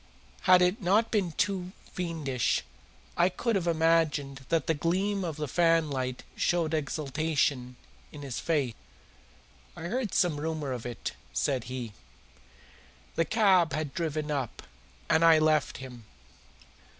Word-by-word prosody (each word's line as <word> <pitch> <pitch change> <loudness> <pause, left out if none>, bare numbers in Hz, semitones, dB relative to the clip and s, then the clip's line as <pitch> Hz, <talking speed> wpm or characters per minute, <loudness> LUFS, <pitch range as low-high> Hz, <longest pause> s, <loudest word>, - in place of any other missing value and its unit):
Had 180 0 +8
it 180 +6 +1
not 205 +5 +2
been 190 -7 0
too 185 +1 -1 0.2
fiendish, 160 -8 -1 0.5
I 175 +1 +4
could 230 +5 -1
have 180 -3 0
imagined 160 -4 +1
that 165 -1 +1
the 160 - +2
gleam 190 +6 0
of 165 -4 -3
the 150 -1 -3
fanlight 150 -5 +1
showed 165 -2 +1
exultation 145 -3 -1 0.4
in 145 -1 -9
his 135 -4 -4
face. 145 -8 0 1.0
"I - - -7
heard 225 +5 -2
some 165 -5 +2
rumour 155 -3 -3
of 125 -2 -4
it," 120 - -5 0.2
said 130 -4 0
he. 125 -3 -5 1.2
The 165 - +1
cab 185 -5 +3
had 150 -2 -3
driven 155 -2 -2
up, 135 -5 -3 0.4
and 160 +1 +3
I 165 -1 +7
left 155 -2 +2
him. 125 -3 -10
160 Hz, 135 wpm, -29 LUFS, 140-175 Hz, 1.2 s, Had